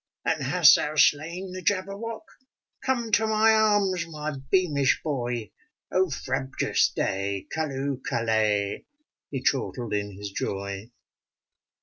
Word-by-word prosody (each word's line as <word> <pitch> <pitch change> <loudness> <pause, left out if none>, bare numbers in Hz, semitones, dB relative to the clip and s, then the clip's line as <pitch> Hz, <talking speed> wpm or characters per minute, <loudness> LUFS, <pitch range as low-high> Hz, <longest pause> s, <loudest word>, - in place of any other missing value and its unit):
'* - - -51
And - - 0
hast - - +6
thou 150 +1 -2
slain 170 +6 +2
the 185 0 -6
Jabberwock? 200 +4 -2 0.6
Come 240 -4 -1
to 220 +1 +3
my 220 +1 +4
arms, 205 -5 +2
my 155 -1 -5 0.2
beamish 150 -8 +2
boy! 120 -6 -3 0.4
Oh, 185 0 +2
frabjous 135 -2 0
day! 100 0 -2
Calloohl 140 -3 -2
callay! 110 -3 0 0.4
He 135 -2 -4
chortled 125 -5 -1
in 100 -1 -2
his 100 0 -6
joy. 100 +2 -4
145 Hz, 120 wpm, -26 LUFS, 110-190 Hz, 0.6 s, hast